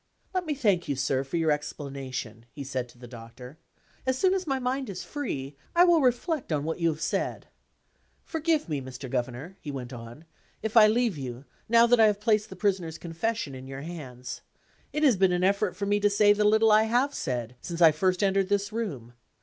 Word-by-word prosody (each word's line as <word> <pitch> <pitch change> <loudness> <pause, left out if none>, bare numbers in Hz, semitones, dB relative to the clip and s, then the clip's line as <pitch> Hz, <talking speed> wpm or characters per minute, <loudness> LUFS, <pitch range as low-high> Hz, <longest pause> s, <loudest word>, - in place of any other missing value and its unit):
"Let 365 -2 -1
me 300 - -1
thank 205 -10 +1
you, 140 - -1
sir, 135 0 0
for 140 +5 -3
your 160 -2 +2
explanation," 135 -6 -5
he 140 +4 -8
said 130 -2 -4
to 120 - -18
the 120 0 -11
Doctor. 120 +4 -11 0.4
"As 260 0 0
soon 375 +6 +3
as 375 -3 -2
my 270 -2 +1
mind 260 0 -2
is 185 -2 -5
free, 145 - -5 0.2
I 345 - +7
will 345 -3 +5
reflect 260 - 0
on 145 -2 0
what 160 +2 -3
you 170 - +2
have 155 0 -4
said. 160 - -2 0.8
Forgive 320 - 0
me, 150 -4 -2
Mr. 130 +1 -8
Governor," 130 +8 -4
he 150 - -7
went 130 -2 -6
on, 120 +6 -10 0.4
"if 220 +1 -3
I 215 -2 +9
leave 225 -6 +1
you, 130 0 -6 0.2
now 230 0 +6
that 240 0 +4
I 220 - +7
have 205 -1 +1
placed 215 -1 +1
the - - -9
Prisoner's 185 -6 -1
confession 170 0 -3
in 130 0 -9
your 135 0 -7
hands. 130 -7 -7 0.5
It 300 +1 -1
has 260 -9 +5
been 190 -1 +3
an 180 0 0
effort 195 -1 +1
to 200 - -2
me 205 +1 +2
to 205 0 +3
say 205 0 +5
the 210 0 +1
little 220 +1 +5
I 215 +1 +6
have 250 +5 +1
said, 125 - -3
since 170 -2 -5
I 165 -2 +8
first 185 +5 0
entered 195 -1 +2
this 205 +1 0
room. 140 - -4
180 Hz, 215 wpm, -27 LUFS, 135-225 Hz, 0.8 s, I